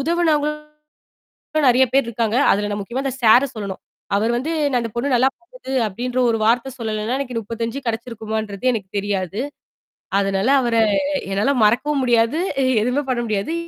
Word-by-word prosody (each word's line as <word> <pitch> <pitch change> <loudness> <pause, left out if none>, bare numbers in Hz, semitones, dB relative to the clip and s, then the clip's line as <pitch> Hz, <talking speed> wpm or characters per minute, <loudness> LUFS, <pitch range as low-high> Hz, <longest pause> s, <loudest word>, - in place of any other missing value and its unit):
உதவினவங்களும், 300 -1 0 1.0
நிறைய 260 +2 +5
பேர் 275 -3 +3
இருக்காங்க. 230 -1 -1 0.2
அதில 205 +1 0
நான் 205 - -2
முக்கியமா 240 +7 -4
அந்த 265 - -1
சார 235 +4 +6
சொல்லனும். 200 -3 -6 0.4
அவர் 220 +3 +1
வந்து 260 +7 -2 0.2
நான் 250 - +2
இந்த 230 - -4
பொண்ணு 240 +4 -1
நல்லா 255 +2 +4
பண்ணுது 350 - -12 0.2
அப்பிடின்ற 245 +5 -3
ஒரு 225 - 0
வார்த்தை 235 +4 +2
சொல்லலன்னா, 220 +1 -2
எனக்கு 255 -3 -4
35 230 +3 -4
கிடைச்சிருக்குமான்றது 220 -1 -3
எனக்குத் 205 -3 -5
தெரியாது. 195 0 -2 0.8
அதனால 195 +3 0
அவர 240 -2 0 0.6
என்னால 205 +8 +1
மறக்கவும் 265 +6 +2
முடியாது. 240 +4 +2 0.2
எ 260 - +2 0.2
எதுவுமே 250 +5 0
பண்ண 245 -2 0
முடியாது 215 +7 -2
235 Hz, 155 wpm, -20 LUFS, 215-260 Hz, 1.0 s, சார